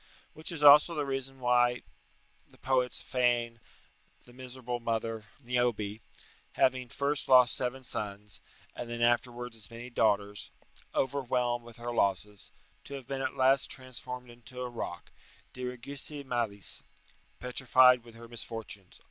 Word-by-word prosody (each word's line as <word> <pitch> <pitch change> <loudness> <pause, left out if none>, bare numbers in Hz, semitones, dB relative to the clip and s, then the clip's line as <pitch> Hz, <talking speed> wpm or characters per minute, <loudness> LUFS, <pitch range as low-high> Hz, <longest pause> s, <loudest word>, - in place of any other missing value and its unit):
Which 155 +2 -5
is 160 -3 -4
also 150 +4 +8
the 150 -2 -1
reason 135 -1 -3
why 120 -1 +3 0.7
the - - -21
poets 130 -1 0
feign 120 -2 +1 0.7
the 120 - -16
miserable 125 -1 -6
mother, 115 -1 -2
Niobe, 120 -5 -1 0.5
having 130 -1 +2
first 140 +4 -1
lost 125 -1 +7
seven 130 +1 -3
sons, 105 -3 -5 0.3
and 120 - -6
then 120 0 -2
afterwards 120 0 +1
as 105 -3 -13
many 120 +2 -9
daughters 105 -3 +1 0.5
(overwhelmed 125 -3 0
with 120 0 -13
her 120 0 -4
losses), 100 -1 -1 0.4
to 140 - -7
have 135 -2 -8
been 135 +1 -4
at - - -2
last 130 +1 +3
transformed 125 -1 -7
into 120 +2 -10
a 125 - -3
rock 120 - -6 0.4
"Diriguisse 135 +3 -2
malis," 115 -6 -1 0.6
["Petrified 125 -1 +5
with 115 -1 -15
her 115 0 -11
misfortunes." 115 -5 -5
125 Hz, 135 wpm, -30 LUFS, 115-130 Hz, 0.7 s, also